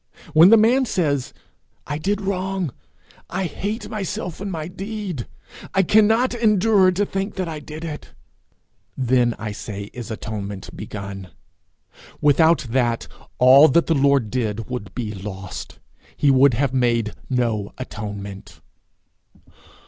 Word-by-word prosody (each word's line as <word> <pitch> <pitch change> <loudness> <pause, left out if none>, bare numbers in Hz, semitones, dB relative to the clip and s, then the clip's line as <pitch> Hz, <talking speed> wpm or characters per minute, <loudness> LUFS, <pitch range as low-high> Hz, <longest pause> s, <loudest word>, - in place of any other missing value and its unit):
When 165 +4 +8
the 225 - +8
man 245 +5 +4
says, 145 - 0 0.5
'I 145 - -3
did 200 +5 -1
wrong; 190 - -2 0.6
I 190 +2 -2
hate 210 - -4
myself 195 -3 -4
and 200 -1 -4
my 160 -3 -4
deed; 195 - -5 0.5
I 195 - +4
cannot 220 +6 +4
endure 210 -4 +4
to 200 +3 0
think 195 +1 -3
that 185 -2 -2
I 160 -2 -5
did 155 +2 -8
it!' 150 -2 -7 0.9
then, 125 -2 +2
I 110 -1 -5
say, 100 -1 -7
is 120 -2 -7
atonement 105 -3 -6
begun. 100 -2 -7 0.9
Without 160 +1 +4
that, 120 -2 0 0.3
all 130 +4 +8
that 170 +4 +3
the 165 - +2
Lord 140 -6 +2
did 115 -3 -2
would 120 -6 -5
be 110 -4 -3
lost. 95 -2 -7 0.4
He 145 - +4
would 135 -1 +5
have 135 +1 0
made 120 -4 +1 0.2
no 115 -5 0
atonement. 100 -5 -7
140 Hz, 135 wpm, -22 LUFS, 115-190 Hz, 0.9 s, When